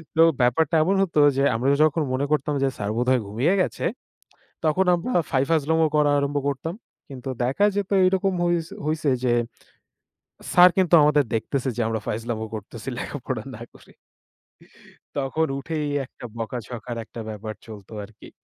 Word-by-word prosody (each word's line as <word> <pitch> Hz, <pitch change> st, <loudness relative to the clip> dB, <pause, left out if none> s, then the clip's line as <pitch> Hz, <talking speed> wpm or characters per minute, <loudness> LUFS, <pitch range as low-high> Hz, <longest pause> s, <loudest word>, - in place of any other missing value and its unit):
তো 160 Hz, -, +5 dB, 0.2 s
ব্যাপারটা 135 Hz, +6 st, +2 dB
এমন 190 Hz, +5 st, +1 dB
হতো 170 Hz, -5 st, +1 dB, 0.2 s
যে, 135 Hz, -, +2 dB
আমরা 125 Hz, +4 st, +1 dB
যখন 155 Hz, +1 st, +2 dB
মনে 135 Hz, +2 st, 0 dB
করতাম 150 Hz, 0 st, +1 dB
যে -, -, +3 dB
স্যার 100 Hz, 0 st, -2 dB
বোধহয় 125 Hz, +1 st, +2 dB
ঘুমিয়ে 120 Hz, -, +1 dB
গেছে। -, -, -2 dB, 0.8 s
তখন 160 Hz, +5 st, +2 dB
আমরা 175 Hz, +9 st, -4 dB, 0.2 s
ফাই 130 Hz, 0 st, +2 dB
ফাইজলাম 160 Hz, 0 st, +2 dB, 0.2 s
করা 150 Hz, -1 st, +4 dB
আরম্ভ 140 Hz, +1 st, -1 dB
করতাম। 145 Hz, +5 st, -3 dB, 0.3 s
কিন্তু 135 Hz, -1 st, -7 dB
দেখা 135 Hz, +11 st, +2 dB
যেত 205 Hz, -2 st, -1 dB, 0.2 s
এইরকম 190 Hz, +1 st, +2 dB
হইছ 170 Hz, -2 st, 0 dB, 0.2 s
হইছে 155 Hz, -1 st, 0 dB
যে, 125 Hz, -2 st, +2 dB, 1.2 s
স্যার 180 Hz, 0 st, +8 dB
কিন্তু 185 Hz, -2 st, +2 dB
আমাদের 150 Hz, 0 st, +4 dB
দেখতেছে 130 Hz, +4 st, -1 dB
যে 120 Hz, -, +1 dB
আমরা 110 Hz, -1 st, -1 dB
ফাইজলামো 110 Hz, 0 st, -3 dB
করতেছি 110 Hz, +3 st, -7 dB
লেখাপড়া 130 Hz, -5 st, -4 dB
না 110 Hz, -, -12 dB
করে। -, -, -18 dB, 1.3 s
তখন 140 Hz, +4 st, 0 dB
উঠেই 150 Hz, +1 st, -3 dB, 0.2 s
একটা 125 Hz, -, -15 dB
বকাঝকার 120 Hz, +1 st, -5 dB
একটা 115 Hz, -, -9 dB
ব্যাপার 110 Hz, 0 st, -6 dB
চলতো 105 Hz, -2 st, -11 dB
আরকি। 105 Hz, +1 st, -14 dB
140 Hz, 155 wpm, -24 LUFS, 115-160 Hz, 1.3 s, স্যার